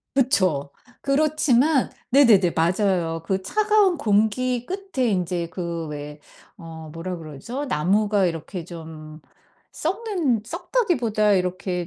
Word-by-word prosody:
그쵸. 185 - +2 0.3
그렇지만 285 -1 +2 0.2
네네네. 220 -10 +5
맞아요. 170 -1 +1
그 190 +1 -1
차가운 420 - +2
공기 230 +4 +1
끝에 380 -10 -2
인제 180 -4 -1
그 170 -1 -4
왜 150 0 -7 0.4
어 160 -1 -10
뭐라 175 +2 -5
그러죠? 165 - -6
나무가 205 - +1
이렇게 170 +1 -5
좀 160 -2 -10 0.5
썩는 345 - -1
썩다기보다 235 - 0
이렇게 180 -1 -1
195 Hz, 240 characters per minute, -23 LUFS, 165-260 Hz, 0.5 s, 네네네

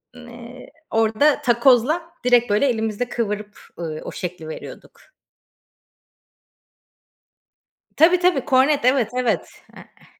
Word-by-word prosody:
N 245 -1 -13
eee, 245 +2 -12 0.2
orada 225 +7 +2
takozla 250 +6 +3 0.2
direkt 245 -2 +3
böyle 210 +7 +2
elimizde 225 0 -2
kıvırıp, 210 -2 -4 0.2
ııı, 155 -2 -5
o - - -7
şekli 180 -3 -7
veriyorduk. - - -11 2.9
Tabii 350 +3 +4
tabii 350 -8 +1
kornet. 270 0 +2
Evet, 255 -4 +2
evet. 235 -9 -1 0.3
Eee, - - -14
eh. - - -21
240 Hz, 110 wpm, -21 LUFS, 215-265 Hz, 2.9 s, Tabii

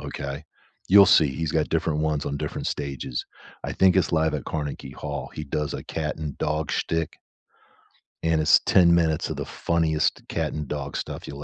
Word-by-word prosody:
Okay? 70 -1 -5 0.5
You'll 100 +1 +9
see, 80 -4 +6
he's 75 +3 -3
got 80 -2 +1
different 80 -2 0
ones 75 -2 0
on 70 - -2
different - - -4
stages. 70 -3 -3 0.4
I - - -3
think 95 -1 +4
it's 95 - +2
Live 80 -1 +2
at 75 - -3
Carnegie 75 -2 -4
Hall; 70 -2 -5
he 75 - -5
does 75 +1 -2
a - - -6
cat 75 -1 -3
and 75 -3 -5
dog 75 0 -1
shtick 80 -1 -2 1.1
and 80 -1 +2
it's 80 - +6
10 85 -2 +5
minutes 80 -2 +2
of - - -3
the - - -3
funniest 80 -2 0
cat - - -2
and 75 -1 -4
dog 70 -1 -4
stuff - - -6
you'll 70 0 -7
75 Hz, 190 wpm, -25 LUFS, 75-80 Hz, 1.1 s, You'll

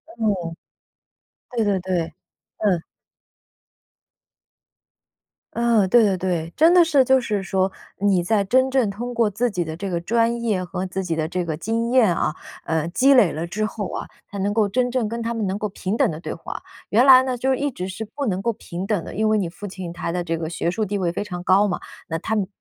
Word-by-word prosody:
嗯。 200 -7 -1 1.0
对 235 -3 0
对 200 -2 +1
对， 175 -3 -2 0.4
嗯。 195 -6 +1 2.7
嗯， 235 -4 +3
对 240 +3 +6
对 195 -3 +2
对。 170 -3 -2
真 325 +3 +6
的 360 -1 +7
是 300 -5 +4
就 265 +1 +4
是 210 -4 -1
说， 190 0 0 0.3
你 195 -3 +3
在 205 +3 +2
真 260 +6 +3
正 260 -5 +2
通 240 +5 -5
过 230 -2 +2
自 235 +5 0
己 180 -5 -1
的 160 -1 -6
这 195 +2 -4
个 175 -2 -1
专 235 +4 +1
业 210 -6 0
和 180 +1 -4
自 190 +1 -3
己 170 -3 -2
的 155 -1 -1
这 180 +1 -2
个 160 -2 -2
经 225 +7 -1
验 235 -8 +5
啊， 155 - -1 0.3
呃， 160 -1 0
积 265 +10 +4
累 230 -11 +5
了 160 +3 -4
之 215 +5 -1
后 210 -3 -4
啊， - - -5 0.2
才 200 - -7
能 200 +2 0
够 215 -1 +3
真 245 +5 0
正 245 -3 0
跟 230 +2 -4
他 230 +1 -2
们 220 -3 -2
能 190 +1 -1
够 210 0 -3
平 195 +1 -3
等 - - +3
地 155 - -6
对 - - -5
话。 165 - -7 0.3
原 235 +5 +4
来 260 -1 +9
呢， 255 -1 -2
就 265 +2 +1
一 285 +2 -1
直 185 -6 -5
是 190 +4 -5
不 280 +6 -5
能 190 -5 -1
够 235 - +1
平 180 -2 -6
等 195 -4 -1
的， - - -8
因 215 +2 +1
为 215 - +3
你 195 -4 0
父 205 +4 -8
亲 185 -3 -7
他 170 - -3
的 175 0 -2
这 165 -1 -2
个 160 -1 -4
学 170 0 -1
术 215 +5 -1
地 205 +1 -2
位 180 -3 0
非 190 - -3
常 180 -4 -6
高 195 +3 +4
嘛， 185 - -2 0.3
那 165 0 -2
他 220 +6 -2
们 200 -3 0
200 Hz, 245 characters per minute, -22 LUFS, 180-230 Hz, 2.7 s, 来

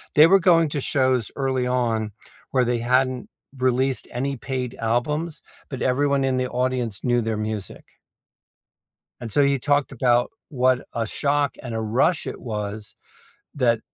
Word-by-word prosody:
they 150 - +9
were 195 +2 +6
going 165 -2 +4
to 145 -1 -3
shows 130 -5 +1
early 130 -2 0
on 115 -4 0 0.4
where 130 -2 +3
they 120 0 0
hadn't 125 +1 +1 0.3
released 130 +1 0
any 135 +3 -2
paid 130 -1 -3 0.2
albums, 150 +6 -2 0.3
but 135 -3 -6
everyone 140 +2 +2
in 130 -1 +1
the 125 0 -1
audience 125 -4 -1
knew 120 -1 +2
their 110 -1 -2
music. 105 -2 -5 1.4
And 115 -3 -6
so 145 - +3
you 140 -1 +3
talked 145 +1 +1
about 120 -1 +2 0.2
what 130 -3 +1
a 115 -2 -1
shock 145 +3 0
and 120 -3 -5
a 110 - -1
rush 125 +10 +1
it - - -6
was 105 -2 -5 0.6
that 120 -5 +2
130 Hz, 155 wpm, -23 LUFS, 120-140 Hz, 1.4 s, they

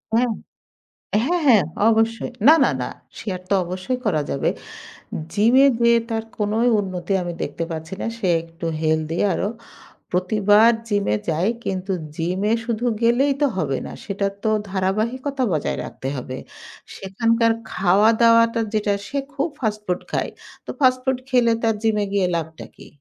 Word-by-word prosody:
হ্যাঁ। 245 +1 +3 1.0
হ্যাঁ, 350 +5 +1
হ্যাঁ। 225 - +6 0.2
অবশ্যই। 225 0 +1 0.2
না, 315 - +10
না, - - +3
না। 125 - -2 0.3
শেয়ার 190 -5 -4
তো 200 - +2
অবশ্যই 185 +8 -3
করা 160 -8 +2
যাবে। 140 - 0 0.8
জিমে 235 +7 +5
যেয়ে 235 0 +5
তার 225 0 -2
কোনোই 215 +3 +1
উন্নতি 185 -1 -4
আমি 175 0 -4
দেখতে 165 - -3
পাচ্ছি 160 +2 -5
না। - - -2
সে 205 - -2 0.2
একটু 165 +1 -8
হেলদি 160 +1 0
আরও। 195 - -1 0.6
প্রতিবার 205 +4 +4 0.2
জিমে 205 - +1
যায় 165 +6 +1 0.2
কিন্তু 190 +1 -3 0.2
জিমে 185 +6 -1
শুধু 235 0 -2 0.2
গেলেই 245 +5 +3
তো 290 - +5
হবে 140 -6 0
না। - - -7
সেটার 200 0 -2
তো 220 - +2 0.2
ধারাবাহিকতা 230 +9 -1
বজায় 155 -3 -1
রাখতে 130 - -7
হবে। 130 0 -6 0.6
সেখানকার 230 +4 +1 0.2
খাওয়া-দাওয়াটা 230 +4 +4
যেটা, 210 -1 +1
সে 280 - -4 0.2
খুব 280 +3 0
ফাস্টফুড 210 -6 -2
খায়। - - -1 0.3
তো - - -12
ফাস্টফুড 255 -1 +2
খেলে 245 -3 +3
তার 225 -1 +2
জিমে 215 -2 +2
গিয়ে 200 -2 +2
লাভটা 160 0 -5
কী? - - -13
210 Hz, 145 wpm, -22 LUFS, 180-230 Hz, 1.0 s, না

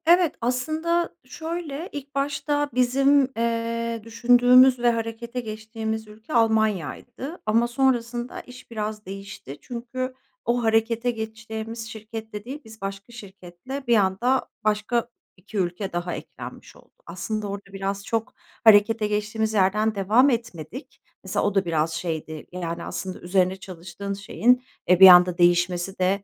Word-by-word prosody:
Evet, 345 0 +5
aslında 315 +8 0
şöyle; 330 -1 -5
ilk 280 -1 -8
başta 290 +1 0
bizim, 270 +2 +3
eee, 230 0 -1
düşündüğümüz 245 +2 +5
ve 240 0 +4
harekete 230 +1 -4
geçtiğimiz 220 0 -5
ülke 215 +7 -11
Almanya'ydı. 220 - 0
Ama 225 +2 +3
sonrasında 240 -1 0
iş 250 -1 -14
biraz 215 -1 -4
değişti. 190 -7 -8
Çünkü 255 +2 -5 0.3
o 240 +1 +1
harekete 225 +2 +2
geçtiğimiz 220 0 -6
şirketle 220 -1 -8
değil, 270 +4 -6
biz 220 0 -14
başka 195 +4 -6
şirketle, 200 +5 -9
bir 240 - +5
anda 210 +7 +1
başka 215 +3 0 0.3
2 200 +3 -9
ülke 185 +1 -2
daha 175 0 -2
eklenmiş - - -9
oldu. - - -21
Aslında 215 -1 -4
orada 200 0 -7
biraz 195 +1 -3
çok 225 +2 -2 0.3
harekete 215 0 +6
geçtiğimiz 210 +1 -1
yerden 210 +2 +2
devam 215 +8 +4
etmedik. 230 - -5 0.2
Mesela, - - -1
o 205 -1 0
da 195 -1 +2
biraz 165 -1 0
şeydi. 160 -3 -4
Yani, 170 -2 -4
aslında, 185 -1 -5
üzerine 185 +1 +1
çalıştığın 185 +1 -7
şeyin, 220 +6 +2 0.2
eee, 180 -1 +5
bir 190 - +12
anda 180 -1 +8
değişmesi 175 +2 +2
de 190 +2 +1
220 Hz, 135 wpm, -24 LUFS, 195-245 Hz, 0.3 s, bir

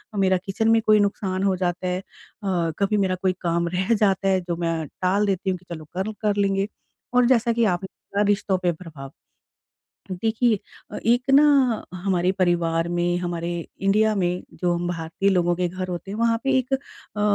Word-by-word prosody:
मेरा 190 -2 +3
किचन 220 +3 0
में 225 0 +4
कोई 215 -1 +5
नुकसान 195 -2 -1
हो 195 -1 +2
जाता 180 0 -2
है 180 0 -1
अ, 185 -4 -4
कभी 200 +1 +2
मेरा 190 -2 +1
कोई 185 -1 +2
काम 170 -1 0
रह 190 +5 +1
जाता 195 -2 +2
है, 190 -1 +3
जो 175 -1 -3
मैं 165 -2 -1 0.2
टाल 195 +3 +2
देती 195 -1 -1
हूँ 185 - 0
कि 180 - -25
चलो, 155 -1 -8
कल 200 +3 -1
कर 210 -2 +1
लेंगे 195 0 +1 0.5
और 250 0 +5
जैसा 240 -1 +3
कि 235 0 +2
आपने 190 +2 -6 0.3
कहा, 205 - +3
रिश्तों 205 -2 +1
पे 180 -1 +1
प्रभाव। 155 -5 -10 1.0
देखिए, 220 +3 +1 0.5
एक 245 +2 0
ना 290 - +7 0.5
हमारे 180 -1 0
परिवार 170 -3 +1
में, 175 0 0
हमारे 175 -1 -3 0.3
इंडिया 215 +2 +3
में 180 -1 0 0.2
जो 175 -1 +1
भारतीय 170 +3 -1
लोगों 175 -2 +2
के 180 -1 0
घर 185 +1 -5
होते 180 +2 -5
हैं, 210 - -5
वहाँ 230 0 +2
पे 270 - +2
एक 255 +1 -4
अ, 265 -5 -8
190 Hz, 185 wpm, -23 LUFS, 175-210 Hz, 1.0 s, ना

